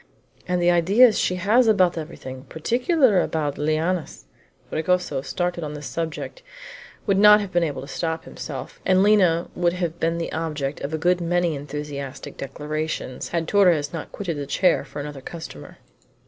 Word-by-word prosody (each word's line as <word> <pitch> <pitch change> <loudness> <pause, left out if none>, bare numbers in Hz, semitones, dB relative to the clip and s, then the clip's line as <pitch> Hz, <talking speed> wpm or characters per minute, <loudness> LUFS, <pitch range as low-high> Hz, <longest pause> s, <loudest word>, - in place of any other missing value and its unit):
And 180 0 +1
the 175 0 +4
ideas 200 +7 +5
she 180 - +1
has 215 +7 +3
about 185 -5 +4
everything, 135 -5 -7
particularly 245 - +2
about 150 -3 -2
lianas 155 - -1 0.2
" - - -37
Fragoso, 160 -4 0
started 175 +3 -2
on 150 -1 -5
this 150 0 -8
subject, 165 - -4 0.6
would 195 -2 +2
not 210 0 +8
have 200 -3 -5
been 175 - +2
able 145 -5 -2
to - - -9
stop 160 +1 -3
himself, 135 -5 -8
and 185 0 +4
Lina 185 -5 +4
would 175 -1 +1
have 175 -2 -3
been 165 +1 0
the 170 - -3
object 150 -3 -3
of 140 - -4
a 160 - -1
good 180 +2 +2
many 175 0 +1
enthusiastic 140 -1 -6
declarations, 150 -1 -4
had 165 -1 -2
Torres 175 -8 +3
not 165 - -6
quitted 175 -6 -4
the 140 -1 -4
chair 180 +4 +2
for 145 - -9
another 145 -1 -6
customer. 160 - -9
165 Hz, 170 wpm, -23 LUFS, 150-180 Hz, 0.6 s, not